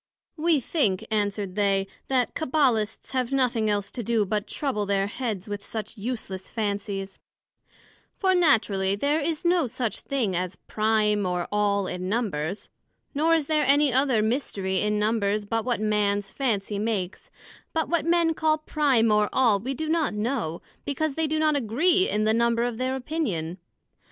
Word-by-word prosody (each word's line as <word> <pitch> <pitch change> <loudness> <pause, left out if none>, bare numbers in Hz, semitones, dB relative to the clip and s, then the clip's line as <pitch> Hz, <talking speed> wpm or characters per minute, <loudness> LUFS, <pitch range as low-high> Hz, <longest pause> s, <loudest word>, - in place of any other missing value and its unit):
We 320 -1 +2
think, 225 - 0
answered 205 -2 -1
they, 195 -1 +1 0.2
that 255 -2 +1
Cabbalists 255 -8 0
have 255 -1 -1
nothing 245 -5 +1
else 205 -1 -1
to 245 - -5
do 225 -1 +1
but 210 +1 -2
to - - -7
trouble 210 -8 -1
their 195 -1 +1
heads 210 -2 -4
with 205 -1 -5
such 220 +2 -6
useless 200 -4 -5
Fancies; 200 -3 -3 1.0
for 380 -2 +2
naturally 210 - +3
there 285 +8 +1
is 320 +2 -2
no 345 -4 +3
such 240 -1 -3
thing 235 -9 -1
as 180 +1 -2
prime 215 -1 +1
or 180 -1 -1
all 205 -1 +1
in 180 0 -4
Numbers; 195 -6 -2 0.5
nor 320 +3 +3
is 315 -3 0
there 305 0 +2
any 285 -1 +4
other 260 -4 +3
mystery 200 -6 -1
in 210 0 +1
Numbers, 210 -1 0
but 225 +2 -1
what 245 -3 0
Man's 205 -1 0
fancy 210 -6 -1
makes; 210 - -3 0.4
but 320 -1 0
what 340 -3 +1
Men 335 0 +3
call 310 0 +2
Prime, 280 -7 +2
or 210 0 +3
All, 230 -6 +3
we 260 +6 -3
do 315 +4 -3
not 315 -7 +1
know, 210 -7 -2 0.2
because 285 +1 -1
they 320 +2 0
do 310 +1 0
not 310 -1 +2
agree 320 - +2
in 210 +1 +1
the 215 0 +3
number 235 0 +2
of 240 -2 -2
their 260 +1 0
opinion. 210 - -3
225 Hz, 170 wpm, -26 LUFS, 205-280 Hz, 1.0 s, any